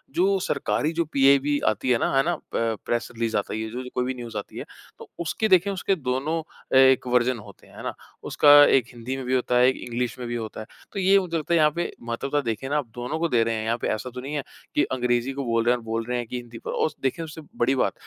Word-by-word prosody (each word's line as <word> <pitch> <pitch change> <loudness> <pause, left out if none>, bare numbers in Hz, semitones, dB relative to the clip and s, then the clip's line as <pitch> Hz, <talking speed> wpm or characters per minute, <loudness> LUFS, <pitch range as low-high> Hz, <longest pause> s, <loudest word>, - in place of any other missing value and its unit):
जो 195 +2 +3
सरकारी, 150 -1 -1
जो 170 0 0
पीआईबी 140 0 +3
आती 110 +4 0
है 125 - +4
ना, - - 0
है 135 - +5
ना? 175 +1 0 0.2
प 115 -1 0
प्रेस 120 0 -1
रिलीज़ 115 -1 -1
आता 100 - -3
है, 110 - -3
ये 110 0 -4
जो 125 +3 -5
जो 125 - -8
कोई 125 - +1
भी 130 - -2
न्यूज़ 120 -4 -7
आती 100 - -7
है, - - -5 0.3
तो - - -11
उसके 170 +6 -1
देखें, 185 +1 +5
उसके 195 0 0
दोनों 145 +3 -2 0.3
अ, - - +1
एक 130 -1 +5
वर्ज़न 125 0 +2
होते - - -14
हैं, - - -18
है - - -8
ना? - - -3 0.3
उसका 145 - +3 0.2
एक 130 -4 +4
हिंदी 120 +2 -5
में 130 - -6
भी 130 - -1
होता 125 -1 +1
है, 125 +1 +6
एक 130 - -1
इंग्लिश 120 0 -3
में 125 - -5
भी 120 - -3
होता 110 -2 -5
है। - - -8 0.3
तो 200 - -4
ये 195 +1 +5
मुझे 170 -3 -2
लगता 155 +2 -2
है, 170 - +5
यहाँ 150 -1 +4
पे 175 0 -2
महत्वता 135 +5 -1
देखें 115 +1 -3
ना, 150 - +1
आप 145 -5 -2
दोनों 125 +6 -3
को 170 - +1
दे 115 -2 +3
रहे 115 0 -1
हैं। 110 - -3
यहाँ 115 +1 0
पे - - -1
ऐसा 110 +4 -2
तो 125 - -5
नहीं 140 +3 -6
है 140 - -2 0.3
कि - - +4
अंग्रेजी 125 0 0
को 140 0 -4
बोल 115 -1 +1
रहे 120 - +4
हैं - - 0
और 120 - -12
बोल 115 0 -2
रहे 125 0 -2
हैं 120 - -4
कि 125 - -4
हिंदी 120 -1 -9
प - - -6
और - - +1
उस 155 - -3
देखें, 135 +5 -1
उससे 160 0 -8 0.2
बड़ी 125 +3 +2
बात, 130 - +1
125 Hz, 290 wpm, -25 LUFS, 120-150 Hz, 0.3 s, है